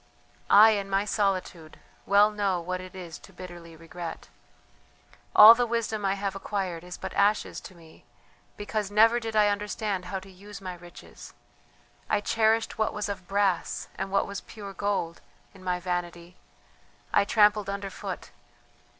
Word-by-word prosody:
"I, 215 +2 +8
in 200 -2 -2
my 195 +1 +1
solitude, 185 -6 -2 0.3
well 205 +1 +5
know 200 -4 0
what 185 +2 -4
it 185 0 -11
is 175 -3 -8
to - - -16
bitterly 175 -2 -11
regret. 165 - -8 1.1
All 215 +2 +11
the 240 +1 0
wisdom 220 -3 -2
I 195 0 +1
have 195 -1 -3
acquired 190 -4 -4
is 180 0 -8
but - - -6
ashes 205 +1 +1
to 185 - -12
me 165 -2 -18 0.5
because 205 -1 -3
never 225 +3 +5
did 225 -2 -5
I 210 -1 +5
understand 205 -2 -2
how 190 +2 -4
to 190 +1 -14
use 200 +2 -11
my 185 -2 -6
riches, 175 0 -13 0.7
I - - +2
cherished 220 +2 +1
what 220 - 0
was 210 -1 -3
of 190 -3 -6
brass, 195 -3 0
and 195 - -4
what 195 - +2
was 200 0 -6
pure 200 -2 -10
gold, 195 -5 -2 0.3
in 190 -2 -16
my 180 -1 -1
vanity, 175 -1 -4 0.8
I 205 - +5
trampled 210 -1 +3
underfoot. 200 0 -6
195 Hz, 160 wpm, -27 LUFS, 180-210 Hz, 1.1 s, All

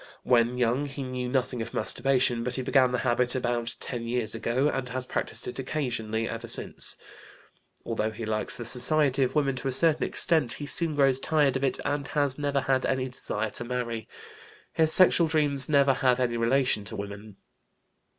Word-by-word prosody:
When 120 0 +2
young 125 +4 0
he 140 0 -6
knew 125 -1 -4
nothing 125 -2 -1
of 115 +1 -7
masturbation, 125 -3 +1
but 125 +1 -2
he 130 - -3
began 130 -1 +3
the 125 - 0
habit 125 0 +1
about 120 -2 -1
ten 120 -2 -4
years 115 -3 -1
ago, 120 +5 0
and 135 -4 -2
has 130 +1 -4
practised - - -4
it 125 - -6
occasionally 115 -5 -2
ever 115 +1 -6
since. 115 - 0 0.9
Although 110 -1 -1
he 110 +1 -7
likes 110 0 0
the 120 - -6
society 135 +3 +2
of 130 - 0
women 140 -3 +1
to 130 - -4
a - - 0
certain 155 +4 +3
extent, 155 -8 +2
he 145 - -6
soon 160 +1 +2
grows 135 -2 +3
tired 145 -2 +1
of 135 - -2
it, 135 - 0
and 145 -1 -2
has 145 -2 0
never 140 -1 0
had 130 -1 0
any 130 -1 -1
desire 110 -3 -4
to - - -2
marry. 120 -2 -4 0.7
His 160 -1 +2
sexual 175 -2 +5
dreams 145 -4 +3
never 140 -2 +4
have 125 -1 +1
any 120 -2 0
relation 115 -1 +1
to - - -5
women. 100 +1 -8
125 Hz, 190 wpm, -27 LUFS, 120-140 Hz, 0.9 s, sexual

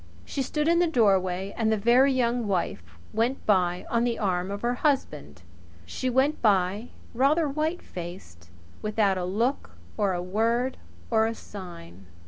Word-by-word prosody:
She 275 - -3
stood 300 +3 -1
in 340 +1 +4
the 350 - +3
doorway 195 - +1
and 220 -1 +1
the 220 - +2
Very 245 +6 +4
Young 245 -3 0
Wife 185 - -1 0.3
went 235 +5 0
by 180 -3 +2
on 235 0 +1
the 240 -1 0
arm 185 -2 -1
of 200 +2 -5
her 240 +1 +1
husband. 245 - -1 0.4
She 255 - -3
went 265 +4 +1
by 200 +1 +2 0.2
rather 290 +6 +3
white 310 +5 -2
faced 170 - -9 0.3
without 210 -3 +1
a 180 - -2
look 230 +9 -2 0.2
or 200 -3 +1
a 175 0 -3
word 230 +7 0 0.3
or 220 -1 +3
a 225 - -3
sign! 95 - -11
220 Hz, 160 wpm, -26 LUFS, 185-255 Hz, 0.4 s, in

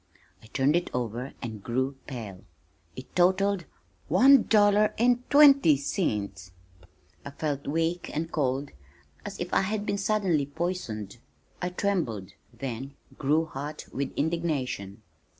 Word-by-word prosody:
I - - -16
turned 135 +6 +1
it 175 - 0
over 125 +2 -3
and 110 -3 -6
grew 130 +5 -1
pale. 110 -8 -7 0.5
It - - -11
totalled 190 +1 +2 0.4
one 260 - +6
dollar 210 0 +4
and 245 +1 +2
twenty 275 - +7
cents! 100 - -3 0.7
I - - -6
felt 140 -1 -3
weak 165 +4 -1
and 165 +2 -3
cold 140 -1 -1 0.5
as 200 - -7
if 175 +1 -4
I - - +4
had 205 +2 -2
been 200 - -1
suddenly 195 -8 +1
poisoned. 145 - -4 0.4
I 180 - -1
trembled, 175 - -2 0.2
then 135 +1 -6 0.2
grew 150 +3 +2
hot 150 0 -7
with 135 0 -2
indignation. 140 - -2
150 Hz, 130 wpm, -27 LUFS, 125-190 Hz, 0.7 s, twenty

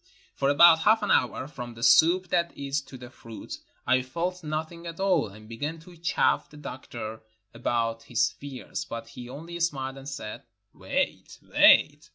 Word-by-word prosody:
For 135 - 0
about 160 +3 +7
half 215 +5 +3
an - - 0
hour, 130 +1 +1
from 120 -5 -8
the 115 - -8
soup, 175 +6 +5
that 170 -1 0
is, 140 +1 -2
to 130 - -11
the 125 0 -11
fruit, 115 -3 -9 0.3
I 130 +1 +3
felt 170 +8 -4
nothing 160 +2 -4
at 165 +1 -8
all, 195 - +2
and 110 +2 -14
began 145 +8 -4
to 175 +2 -15
chaff 170 0 +1
the 150 - -14
doctor 120 -6 -7 0.3
about 115 -1 -1
his 120 - +1
fears, 140 -2 -7
but 115 0 -7
he 120 +1 -10
only 170 +6 -8
smiled 135 -5 -2
and 135 +1 -8
said, 110 -7 -6 0.3
"Wait, - - -3
wait." - - +5
140 Hz, 175 wpm, -27 LUFS, 120-170 Hz, 0.3 s, about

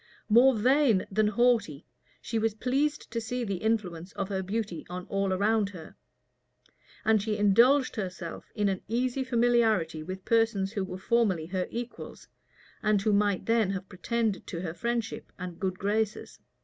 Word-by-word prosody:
More 245 +4 +6
vain 250 -3 +3
than 215 +2 +2
haughty, 215 - +1 0.4
she 225 +1 -1
was 220 -1 0
pleased 275 +6 -1
to 230 - -2
see 245 +2 -3
the 200 -4 -2
influence 190 -4 -2
of 195 0 -3
her 190 -1 -1
beauty 195 -3 -3
on 180 0 -6
all 195 -1 0
around 205 +2 +2
her; 175 -5 -11 1.1
and 220 -1 +4
she 210 0 -2
indulged 240 +7 +4
herself 185 -4 -6
in 210 -2 +1
an 190 -1 -1
easy 250 +4 0
familiarity 230 -10 +2
with 185 +4 -7
persons 225 -4 +2
who 205 -3 -2
were 185 -1 -6
formerly 190 -5 +1
her 180 +1 -2
equals, 240 +1 -7 0.5
and 215 -1 +2
who 215 - +2
might 205 -2 +1
then 225 -3 +2
have 190 -1 -4
pretended 220 +2 -2
to 170 -3 -5
her 165 -3 -4
friendship 235 +3 -3
and 180 -2 -7
good 185 -1 -2
graces. 210 +2 -2
210 Hz, 160 wpm, -28 LUFS, 190-230 Hz, 1.1 s, More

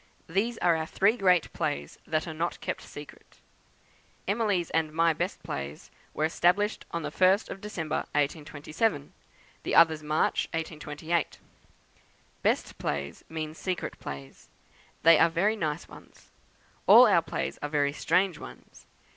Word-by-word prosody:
These 215 +7 0
are 175 -2 +5
our 160 0 -2
three 205 +7 +3
great 180 -7 +2
plays, 70 +1 -3
that 155 +1 -1
are 160 - -4
not 165 +2 -3
kept - - -4
secret. - - -12 0.9
Emily's 200 -5 0
and 160 -1 +1
my 165 +1 +3
best - - -3
plays 70 +1 -6 0.2
were 155 - +1
established 180 +6 +1
the 155 -3 -3
1st 190 +5 +3
of 195 - -7
December, 165 -7 -3 0.2
1827; 150 +3 -1 0.5
the - - -2
others 160 -2 +6
March, 155 +1 +1
1828. 160 0 -3 1.0
Best - - 0
plays 70 0 -3
mean 155 -1 -4
secret 180 +2 -4
plays; 70 -1 -9 0.5
they 165 -1 +7
are 165 - +6
very 195 +7 +1
nice 155 -5 -3
ones. - - -16 0.6
All - - +10
our - - +5
plays - - -4
are 145 - -3
very 145 -1 +1
strange 180 +1 +1
ones. - - -13
160 Hz, 140 wpm, -28 LUFS, 150-180 Hz, 1.0 s, All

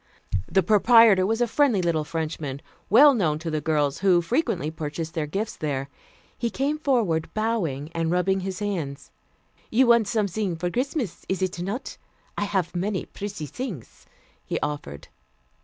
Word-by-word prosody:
The 190 - +3
proprietor 215 -1 +6
was 225 +2 0
a 240 - +3
friendly 255 -3 +2
little 170 -3 +1
Frenchman, 155 -3 -4 0.3
well 280 +7 +8
known 165 - +1
to 165 +1 -5
the 155 -1 -1
girls, 150 -2 0
who 185 -3 +4
frequently 180 - 0
purchased 160 +1 -5
their 155 -2 -2
gifts 205 +8 -3
there. 140 -3 -3 0.5
He 235 - -2
came 285 +5 -1
forward, 220 - +1
bowing 175 -10 -1
and 165 -1 -1
rubbing 180 +2 +1
his 190 0 -4
hands. 165 - -4 0.6
"You 260 +4 +4
want 235 -3 +5
something 205 -3 -1
for 175 +2 -3
Christmas, 255 - -2
is 190 0 0
it 185 -1 -2
not? 200 +9 -4 0.4
I 205 - -1
haf 190 -4 -1
many 190 +2 -1
pretty 200 -6 -6
things," 195 - -7 0.4
he - - -3
offered. 145 - -5
185 Hz, 155 wpm, -25 LUFS, 160-220 Hz, 0.6 s, well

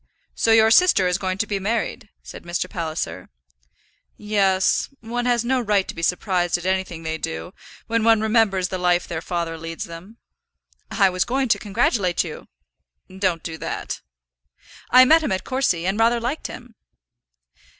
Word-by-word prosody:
"So 225 - +1
your 220 0 +6
sister 355 - +5
is 180 +1 0
going 185 -1 -2
to 220 - 0
be 200 -1 -2
married?" 220 +2 -2
said - - -10
Mr. 175 +1 -3
Palliser. 165 -3 -5 0.9
"Yes. 195 -3 +1
One 240 +2 -3
has 240 -1 +1
no 255 +1 +1
right 205 -4 +1
to - - -5
be 165 - -7
surprised 180 0 0
at 175 - -10
anything 185 -3 -2
they 160 0 -3
do, 165 +3 -5 0.3
when 230 -1 0
one 225 -1 +5
remembers 215 -4 +2
the 185 - -4
life 180 0 +1
their 165 -2 -4
father 170 -2 -3
leads 165 0 -6
them." 175 +7 -11 0.7
"I 195 -3 +3
was 185 0 +1
going 260 +3 -1
to - - +3
congratulate 205 -4 +1
you." - - -9 0.7
"Don't 185 -4 -1
do 160 -1 -6
that." - - -5 0.9
"I 255 +1 +8
met 320 +4 +6
him 305 - -2
at 190 - -1
Courcy, 255 -11 0
and 195 +3 -1
rather 235 +1 +3
liked 245 +7 -3
him." 245 -1 -11
195 Hz, 170 wpm, -22 LUFS, 175-230 Hz, 0.9 s, I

